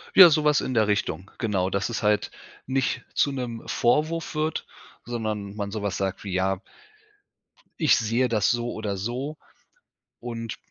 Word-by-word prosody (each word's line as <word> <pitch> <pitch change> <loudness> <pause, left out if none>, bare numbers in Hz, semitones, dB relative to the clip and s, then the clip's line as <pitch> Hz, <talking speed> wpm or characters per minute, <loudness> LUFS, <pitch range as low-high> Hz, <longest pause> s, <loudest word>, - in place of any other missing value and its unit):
Ja, 185 -3 +11
so 155 -1 +2
was 150 -1 +4
in 130 - -3
der 110 -2 +3
Richtung. 100 -3 -1
Genau, 95 -5 0
dass 100 +3 -1
es 115 - -3
halt 105 0 +2 0.3
nicht 135 0 0
zu 140 - +2
'nem 125 -4 -4
Vorwurf 155 +6 +1
wird, 155 0 -1 0.4
sondern 110 -4 -3
man 100 -1 -3
so 110 - -4
was 100 -2 -2
sagt 95 0 -2
wie, 95 -2 -5
ja 95 +1 0 1.2
„Ich 155 -4 +5
sehe 115 +3 +1
das 110 -4 +2
so 120 0 0
oder 105 -3 -3
so“ 130 +9 -3 0.8
und 115 -2 -5
115 Hz, 165 wpm, -25 LUFS, 100-130 Hz, 1.2 s, Ja